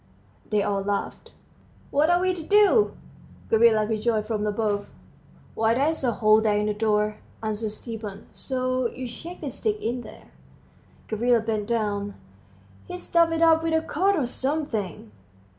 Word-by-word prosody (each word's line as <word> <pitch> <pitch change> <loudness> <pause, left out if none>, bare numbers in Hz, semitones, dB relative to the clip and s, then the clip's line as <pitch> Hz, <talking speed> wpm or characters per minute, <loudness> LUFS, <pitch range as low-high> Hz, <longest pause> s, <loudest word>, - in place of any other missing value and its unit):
They 210 -2 +2
all 200 -1 0
laughed. 200 0 -3 0.6
"What 295 +3 +3
are 350 0 +4
we 370 0 +1
to 355 - -6
do?" 415 +5 +4 0.6
Gavrila 220 -1 +5
rejoined 220 0 0
from 215 -2 -2
above. 205 -1 -1 0.6
"Why, 225 +1 +2
there's 290 +4 0
a 240 -2 +2
hole 215 0 +4
there 210 -2 +2
in 210 - 0
the 210 - 0
door," 210 0 +1 0.3
answered 215 0 -2
Stepan, 215 -2 -7
"so 255 -1 -1
you 255 +1 -6
shake 335 +9 -9
the - - -4
stick 425 -1 -2
in 240 +2 -2
there." - - -13 0.8
Gavrila 235 +2 +2
bent 215 -2 -2
down. 205 -3 -1 0.7
"He's 180 - -7
stuffed 335 -1 +3
it 330 0 +1
up 325 -1 +5
with 325 0 0
a 320 - +3
coat 375 +5 +1
or 295 -7 0
something." 245 - -3
230 Hz, 160 wpm, -25 LUFS, 210-305 Hz, 0.8 s, Gavrila